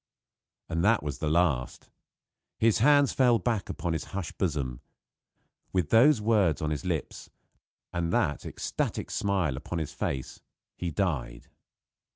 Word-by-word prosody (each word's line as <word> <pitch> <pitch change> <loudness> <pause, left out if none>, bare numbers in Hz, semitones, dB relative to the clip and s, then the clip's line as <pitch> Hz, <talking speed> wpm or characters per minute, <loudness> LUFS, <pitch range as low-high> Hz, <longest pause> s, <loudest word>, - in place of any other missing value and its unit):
And 85 +1 -1
that 105 -1 +3
was 75 -1 -4
the 75 - -1
last. 80 -6 0 0.7
His 115 -1 +3
hands 145 +3 +5
fell 125 -3 +4
back 110 0 -1
upon 85 -2 -2
his 80 -2 -3
hushed 90 -5 -5
bosom. 70 -9 -1 0.9
With 90 -5 0
those 130 +3 +6
words 105 -7 +2
on 75 0 -2
his 75 -4 -3
lips, - - -4 0.6
and 85 -1 -1
that 75 - 0
ecstatic - - -3
smile 95 -8 0
upon 85 +5 -5
his 80 -3 -4
face, 65 -2 -4 0.3
he 90 - -3
died. 75 -9 -2
85 Hz, 140 wpm, -28 LUFS, 75-105 Hz, 0.9 s, those